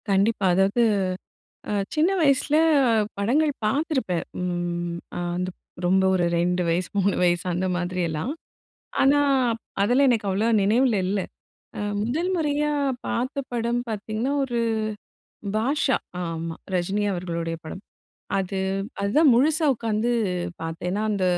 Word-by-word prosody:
கண்டிப்பா 200 Hz, +1 st, +2 dB
அதாவது 195 Hz, +6 st, +3 dB, 0.9 s
அ -, -, -1 dB, 0.2 s
சின்ன 315 Hz, +3 st, +3 dB
வயசில 290 Hz, -1 st, +3 dB, 0.6 s
படங்கள் 280 Hz, +10 st, +2 dB
பார்த்திருப்பேன், 255 Hz, -, 0 dB, 0.2 s
ம், 175 Hz, -1 st, -2 dB, 0.2 s
அ -, -, -2 dB, 0.7 s
ரொம்ப 190 Hz, +2 st, +3 dB
ஒரு 175 Hz, -2 st, +2 dB
2 180 Hz, +1 st, +1 dB
வயசு 175 Hz, +2 st, 0 dB
3 195 Hz, 0 st, +2 dB
வயசு 175 Hz, 0 st, +2 dB
அந்தமாதிரியெல்லாம். 180 Hz, -, -1 dB, 0.7 s
ஆனா, 280 Hz, +2 st, +5 dB, 0.3 s
அப் 225 Hz, -, -6 dB, 0.2 s
அதெல்லாம் 250 Hz, +6 st, +4 dB
எனக்கு 220 Hz, -4 st, 0 dB
அவ்வளவா 210 Hz, +5 st, +1 dB
நினைவில 230 Hz, +3 st, +3 dB
இல்ல. 195 Hz, +1 st, 0 dB, 0.6 s
அ -, -, -4 dB, 0.2 s
முதல் 295 Hz, -, -1 dB
முறையா 300 Hz, -2 st, 0 dB, 0.4 s
பார்த்த 260 Hz, +4 st, -2 dB
படம் 235 Hz, +1 st, 0 dB
பார்த்தீங்கன்னா, 220 Hz, +5 st, -2 dB
ஒரு 240 Hz, -2 st, -2 dB, 1.0 s
பாஷா 265 Hz, +3 st, +1 dB, 0.3 s
ஆமா, 165 Hz, -1 st, -4 dB, 0.2 s
ரஜினி 195 Hz, +4 st, 0 dB
அவர்களுடைய 170 Hz, -2 st, -3 dB
படம். 170 Hz, +5 st, -8 dB, 0.6 s
அது 195 Hz, 0 st, -2 dB, 0.4 s
அதுதான் 270 Hz, +8 st, +4 dB
முழுசா 310 Hz, +6 st, +3 dB
உட்காந்து 225 Hz, 0 st, -1 dB, 0.5 s
பார்த்தேன். 165 Hz, +2 st, -4 dB
ஏன்னா, 210 Hz, +2 st, -1 dB
அந்த 200 Hz, -2 st, 0 dB
205 Hz, 120 wpm, -24 LUFS, 180-255 Hz, 1.0 s, ஆனா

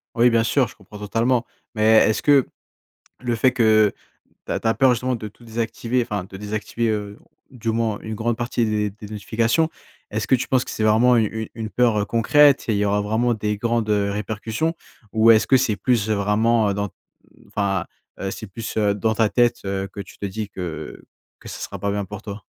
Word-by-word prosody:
Oui, 120 Hz, +1 st, +5 dB
bien 115 Hz, -1 st, +3 dB
sûr 125 Hz, +2 st, +2 dB
je -, -, -14 dB
comprends 105 Hz, +1 st, -13 dB
totalement, 115 Hz, +4 st, 0 dB, 0.3 s
mais 110 Hz, +1 st, +4 dB
est-ce 110 Hz, -, 0 dB
que 140 Hz, -3 st, +4 dB, 0.7 s
le 120 Hz, -2 st, -1 dB
fait 125 Hz, +2 st, +3 dB
que 110 Hz, -4 st, +4 dB, 0.5 s
tu -, -, -5 dB
as -, -, -1 dB
tu -, -, -2 dB
as 115 Hz, -, +3 dB
peur 135 Hz, 0 st, +4 dB
justement 125 Hz, +1 st, 0 dB
de 110 Hz, -2 st, -6 dB
tout 105 Hz, +3 st, -17 dB
désactiver, 115 Hz, +2 st, -2 dB
enfin 105 Hz, -6 st, -3 dB
de 95 Hz, -, -9 dB
désactiver, 110 Hz, +3 st, -2 dB
heu, 105 Hz, 0 st, -3 dB, 0.3 s
du 115 Hz, -3 st, -4 dB
moins 110 Hz, -2 st, -1 dB
une 110 Hz, 0 st, -5 dB
grande 115 Hz, +1 st, -1 dB
partie 120 Hz, -1 st, -1 dB
des 105 Hz, -1 st, 0 dB
des 105 Hz, +1 st, -11 dB
notifications, 115 Hz, +9 st, 0 dB, 0.4 s
est-ce -, -, -2 dB
que -, -, +5 dB
tu 130 Hz, -, -3 dB
penses 130 Hz, -2 st, +1 dB
que -, -, -6 dB
c'est 110 Hz, -, -3 dB
vraiment 115 Hz, +3 st, +5 dB
u 115 Hz, -, +4 dB, 0.2 s
u -, -, -9 dB
une 110 Hz, -1 st, -5 dB
peur, 115 Hz, -2 st, +2 dB
heu, 100 Hz, -, 0 dB
concrète? 140 Hz, +5 st, +4 dB
Et 110 Hz, -, +1 dB
il -, -, 0 dB
y 105 Hz, -, +1 dB
aura 100 Hz, +1 st, +1 dB
vraiment 110 Hz, +4 st, +1 dB
des 105 Hz, -1 st, -2 dB
grandes, 115 Hz, 0 st, -1 dB
heu, 100 Hz, -1 st, +1 dB
répercussions? 110 Hz, -, -2 dB, 0.4 s
Ou 115 Hz, +1 st, +6 dB
est-ce 110 Hz, -, +4 dB
que 135 Hz, -, +6 dB
c'est 120 Hz, -5 st, +1 dB
plus 110 Hz, 0 st, +1 dB
vraiment, 105 Hz, +2 st, +2 dB
heu, 100 Hz, -, 0 dB
dans, 100 Hz, 0 st, -2 dB, 0.6 s
enfin, 100 Hz, -3 st, -1 dB, 0.3 s
heu, 95 Hz, 0 st, -3 dB
c'est 110 Hz, -, -7 dB
plus, 110 Hz, +3 st, -7 dB
heu, 105 Hz, -2 st, +3 dB
dans 110 Hz, +2 st, 0 dB
ta 110 Hz, -1 st, +2 dB
tête, 120 Hz, -1 st, +2 dB
heu, 95 Hz, 0 st, -2 dB
que 100 Hz, -, -11 dB
tu -, -, -13 dB
te -, -, -5 dB
dis 105 Hz, +1 st, -4 dB
que 90 Hz, -4 st, -7 dB, 0.4 s
que -, -, -13 dB
ce -, -, -7 dB
sera -, -, -6 dB
pas 100 Hz, 0 st, -1 dB
bien 100 Hz, 0 st, -1 dB
pour 105 Hz, +1 st, -8 dB
toi? 105 Hz, -1 st, -8 dB
110 Hz, 225 wpm, -22 LUFS, 105-120 Hz, 0.7 s, Ou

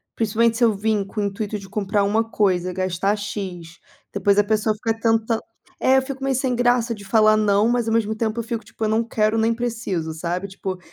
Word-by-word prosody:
principalmente 225 Hz, +1 st, +1 dB
se 250 Hz, -, +1 dB
eu 225 Hz, -, +3 dB
vim 210 Hz, 0 st, 0 dB
com 210 Hz, +2 st, -4 dB
o -, -, 0 dB
intuito 205 Hz, +1 st, -3 dB
de 195 Hz, -1 st, -12 dB
comprar 205 Hz, 0 st, 0 dB
uma 215 Hz, +3 st, +2 dB
coisa, 185 Hz, -3 st, +1 dB
gastar 185 Hz, +2 st, 0 dB
X, 190 Hz, -5 st, -6 dB, 0.3 s
depois 200 Hz, 0 st, +2 dB
a -, -, +5 dB
pessoa 215 Hz, +1 st, +1 dB
fica 225 Hz, +1 st, -2 dB
tentand 225 Hz, 0 st, +1 dB, 0.4 s
é 265 Hz, +1 st, +4 dB
eu 265 Hz, -, +4 dB
fico 265 Hz, 0 st, -6 dB
meio 270 Hz, -1 st, +1 dB
sem 255 Hz, -1 st, 0 dB
graça 245 Hz, -1 st, +2 dB
de 205 Hz, -, -12 dB
falar 215 Hz, 0 st, +4 dB
não, 210 Hz, 0 st, +3 dB
mas 240 Hz, -2 st, 0 dB
ao 225 Hz, -, +1 dB
mesmo 220 Hz, -1 st, +1 dB
tempo 220 Hz, +1 st, -2 dB
eu -, -, -2 dB
fico 230 Hz, 0 st, -4 dB
tipo -, -, -8 dB
eu -, -, 0 dB
não 220 Hz, +2 st, +2 dB
quero 220 Hz, -1 st, 0 dB
nem 225 Hz, +1 st, +2 dB
preciso, 225 Hz, -9 st, -3 dB
sabe, 175 Hz, +4 st, -3 dB
tipo 190 Hz, -1 st, -5 dB
215 Hz, 225 wpm, -22 LUFS, 200-230 Hz, 0.4 s, a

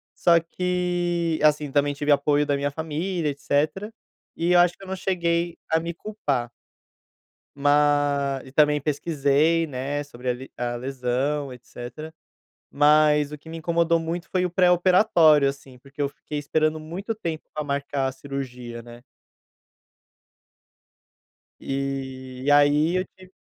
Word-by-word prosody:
Só 170 Hz, -1 st, +4 dB
que, 175 Hz, -1 st, -1 dB
assim, 150 Hz, -2 st, +3 dB
também 145 Hz, 0 st, +2 dB
tive 145 Hz, +1 st, -1 dB
apoio 145 Hz, +1 st, +3 dB
da 145 Hz, -, +1 dB
minha 140 Hz, +1 st, -1 dB
família 160 Hz, +2 st, -2 dB
etcétera, 150 Hz, +8 st, -1 dB, 0.5 s
e 170 Hz, +2 st, 0 dB
eu 175 Hz, -, +6 dB
acho 175 Hz, 0 st, +4 dB
que -, -, -14 dB
eu -, -, -10 dB
não 190 Hz, -, -3 dB
cheguei 170 Hz, -2 st, -1 dB, 0.2 s
a 160 Hz, -, +4 dB
me 170 Hz, +1 st, -4 dB
culpar. 150 Hz, -, -3 dB, 1.1 s
Mas, 145 Hz, -1 st, +2 dB
e 130 Hz, -, -15 dB
também 150 Hz, 0 st, +4 dB
pesquisei, 150 Hz, +2 st, +1 dB
né, 145 Hz, +1 st, -3 dB
sobre 125 Hz, -3 st, -8 dB
a 125 Hz, -, +2 dB
li 130 Hz, +2 st, -10 dB
a 120 Hz, 0 st, -2 dB
lesão, 135 Hz, +3 st, -2 dB
etcétera, 125 Hz, +5 st, -9 dB, 0.6 s
mas 150 Hz, 0 st, +4 dB
o 150 Hz, -, -6 dB
que 160 Hz, -, -15 dB
me 165 Hz, -, -6 dB
incomodou 170 Hz, +1 st, +1 dB
muito 170 Hz, +2 st, -4 dB
foi 185 Hz, -1 st, 0 dB
o -, -, -1 dB
pré-operatório, 175 Hz, -4 st, +4 dB
assim, 135 Hz, -2 st, -10 dB
porque 140 Hz, +2 st, -9 dB
eu 140 Hz, -, +2 dB
fiquei 145 Hz, +1 st, -8 dB
esperando 155 Hz, +1 st, 0 dB
muito 175 Hz, +8 st, -5 dB
tempo 165 Hz, -7 st, -5 dB
para 150 Hz, -1 st, -4 dB
marcar 140 Hz, -1 st, -1 dB
a -, -, -2 dB
cirurgia, 125 Hz, -3 st, -7 dB
né. 120 Hz, +1 st, -13 dB, 2.6 s
E, 130 Hz, -1 st, -5 dB
e 145 Hz, -, +1 dB
aí 145 Hz, +4 st, +4 dB
eu 185 Hz, -, 0 dB
tive 185 Hz, 0 st, -17 dB
150 Hz, 145 wpm, -24 LUFS, 140-170 Hz, 2.6 s, eu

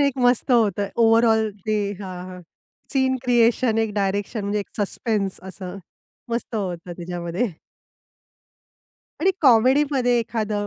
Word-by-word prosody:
एक 280 Hz, -2 st, +1 dB
मस्त 245 Hz, +2 st, +2 dB
होतं 205 Hz, -4 st, +2 dB
ओव्हरऑल 225 Hz, -1 st, +4 dB, 0.2 s
ते 215 Hz, 0 st, +1 dB, 0.2 s
हां, 185 Hz, -2 st, -6 dB
हां. 180 Hz, 0 st, -9 dB, 0.5 s
सीन 265 Hz, -1 st, +2 dB
क्रिएशन 240 Hz, -1 st, +3 dB
एक 220 Hz, -1 st, 0 dB
डायरेक्शन 200 Hz, +2 st, -1 dB
म्हणजे 205 Hz, +1 st, -1 dB
एक 200 Hz, -, -8 dB
सस्पेन्स 205 Hz, -1 st, -1 dB
असं. 185 Hz, 0 st, -8 dB, 0.5 s
मस्त 235 Hz, 0 st, -3 dB
होतं 180 Hz, -4 st, -4 dB
त्याच्यामध्ये. 175 Hz, +4 st, -3 dB, 1.7 s
आणि 375 Hz, +4 st, +4 dB
कॉमेडीमध्ये 255 Hz, 0 st, +4 dB
एखादं 215 Hz, -3 st, -2 dB
220 Hz, 120 wpm, -23 LUFS, 195-245 Hz, 1.7 s, ओव्हरऑल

